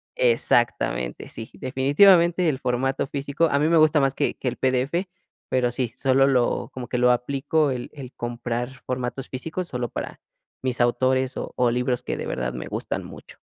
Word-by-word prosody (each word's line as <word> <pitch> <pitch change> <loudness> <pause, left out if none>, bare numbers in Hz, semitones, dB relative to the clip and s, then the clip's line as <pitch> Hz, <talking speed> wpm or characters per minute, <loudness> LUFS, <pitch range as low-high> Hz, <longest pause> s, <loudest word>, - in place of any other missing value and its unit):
Exactamente, 120 - +1
sí, 115 - -8
definitivamente, 170 +6 +4
el 135 - -1
formato 135 +2 0
físico 140 +3 -1
a 140 -2 +1
mí 150 - +2
me 170 - +4
gusta 155 -1 +5
más 135 -1 +1
que - - 0
que - - -5
el 125 - -2
PDF, 130 +8 0 0.4
pero 125 -1 +1
sí, 120 -1 -3
solo 135 0 +3
lo 125 -3 +1
como 125 -2 -6
que 125 - -2
lo 125 0 +4
aplico 140 +5 +1
el 125 -2 -4
el 135 -3 -9
comprar 120 +1 -4
formatos 125 +1 -3
físicos 165 +7 -4
solo 125 -1 -3
para - - -6 0.4
mis 125 -2 -1
autores 130 +2 +1
o - - -5
o 125 -1 +3
libros 125 +1 0
que - - -4
de - - -4
verdad 60 0 -3
me 60 - -5
gustan - - -4
mucho. - - -12
130 Hz, 180 wpm, -24 LUFS, 125-140 Hz, 0.4 s, gusta